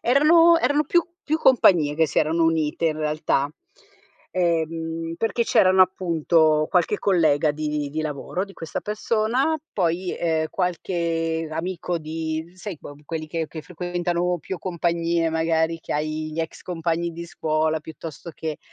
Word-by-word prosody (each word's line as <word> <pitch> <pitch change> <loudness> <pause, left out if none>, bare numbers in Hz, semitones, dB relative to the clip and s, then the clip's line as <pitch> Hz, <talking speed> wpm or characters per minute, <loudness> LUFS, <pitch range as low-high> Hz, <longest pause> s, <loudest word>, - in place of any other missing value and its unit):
erano 330 +6 +6
erano 290 +1 +2
più 345 +1 +3 0.2
più 310 -3 0
compagnie 180 - +4
che 160 +1 +3
si - - 0
erano 165 +2 +2
unite 165 0 +1
in 155 -1 0
realtà. 150 -2 0 0.9
Ehm, 165 -1 -1
perché 225 +3 0
c'erano 185 -3 +4
appunto, 165 -4 +2
qualche 180 +3 +2
collega 160 -6 +3
di 150 -1 -2
di 155 +2 -3
lavoro 155 +4 -3
di 195 - -14
questa 165 -4 -5
persona, 230 +8 0 0.2
poi, 180 -1 0
ehm, 160 -2 +1
qualche 165 -2 -1
amico 175 +1 -3
di 160 +1 -4
sai 185 -2 -6
que 145 - -10
quelli 155 0 -4
che 165 0 -2
che 155 0 -8
frequentano 175 0 -2
più 185 +4 -5
compagnie 170 -1 0
magari, 160 0 +1
che - - -5
hai 155 +1 -2
gli 160 - -2
ex 160 - -6
compagni 170 -1 -2
di 170 +1 -7
scuola, 155 -1 0
piuttosto 160 +1 -9
che, 155 -2 -4
165 Hz, 145 wpm, -23 LUFS, 155-180 Hz, 0.9 s, erano